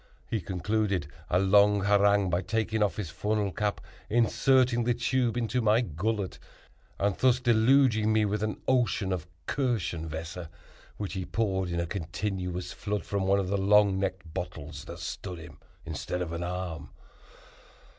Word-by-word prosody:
He 110 - -2
concluded 95 0 -1 0.2
a 90 - +3
long 100 +2 +5
harangue 100 -1 +3
by 85 +2 +1
taking 110 +2 -1
off 100 -6 +2
his 90 -7 -4
funnel 105 +2 -1
cap, 105 +2 -1 0.3
inserting 120 +1 +3
the 120 0 +1
tube 120 0 0
into 120 +1 0
my 110 +1 +4
gullet, 100 +1 -2 0.6
and 100 -1 +1
thus 130 -1 +4
deluging 120 -1 +4
me 110 -1 +3
with 105 +1 -1
an 110 0 -2
ocean 120 -6 +2
of 90 -2 -4 0.2
Kirschenwässer, 85 - -2 0.5
which 100 -2 -4
he 95 -1 -3
poured, 95 -3 -1
in 85 0 -1
a 85 - 0
continuous 90 0 -3
flood, 105 0 -3
from 100 -2 -1
one 100 +1 +4
of 95 -2 -1
the 100 0 0
long 100 0 +4
necked 95 -4 -3
bottles 80 -5 -6
that - - -8
stood 90 -2 -6
him 80 -3 -12 0.3
instead 90 0 -3
of 85 -1 -5
an 85 - -3
arm. 90 -2 -4
100 Hz, 155 wpm, -28 LUFS, 90-110 Hz, 0.6 s, long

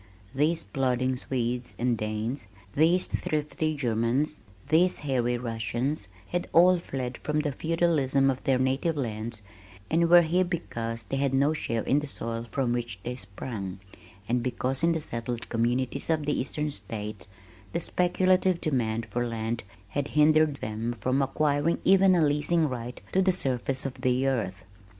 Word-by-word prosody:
These 155 +5 +1
plodding 130 -1 0
Swedes 125 -1 -2
and 120 0 +1
Danes, 110 +2 -3 0.3
these 165 +5 +4
thrifty 155 +1 -2
Germans, 125 +3 0 0.3
these 175 +4 +4
hairy 125 -3 +1
Russians 120 +4 -2 0.2
had 175 0 -1
all 180 +2 +6
fled 130 -6 -5
from 150 0 0
the 150 -1 -1
feudalism 140 -3 +2
of 130 - -6
their 135 -1 +3
native 135 +5 0
lands 110 -3 -3 0.5
and 165 +1 +3
were 175 0 +8
here 175 +3 +2
because 115 -10 -3
they 135 +7 -3
had 135 -1 +1
no 140 +3 +3
share 115 -7 -2
in 140 - +3
the 150 - -5
soil 115 -3 -4
from 130 -3 0
which 120 -5 -3
they 125 - -3
sprung, 100 -3 -5 0.5
and 120 +1 +1
because 130 +2 -1
in 170 0 +3
the 160 - -2
settled 115 -3 -3
communities 125 +5 0
of 155 -2 +1
the 145 - +1
eastern 150 +3 -2
states, 105 -2 -6 0.4
the - - -1
speculative 185 +1 +2
demand 115 -7 0
for 120 +3 0
land 115 0 -3 0.3
had 145 +6 -2
hindered 155 -1 +5
them 115 0 -3
from 130 +2 +1
acquiring 145 +3 +1
even 190 0 +6
a 165 -3 +4
leasing 150 +3 +2
right 125 -2 -5
to 190 - +3
the 190 0 +4
surface 135 -5 -2
of 135 - -5
the 130 +1 +2
earth. 100 -8 -1
135 Hz, 160 wpm, -27 LUFS, 120-155 Hz, 0.5 s, were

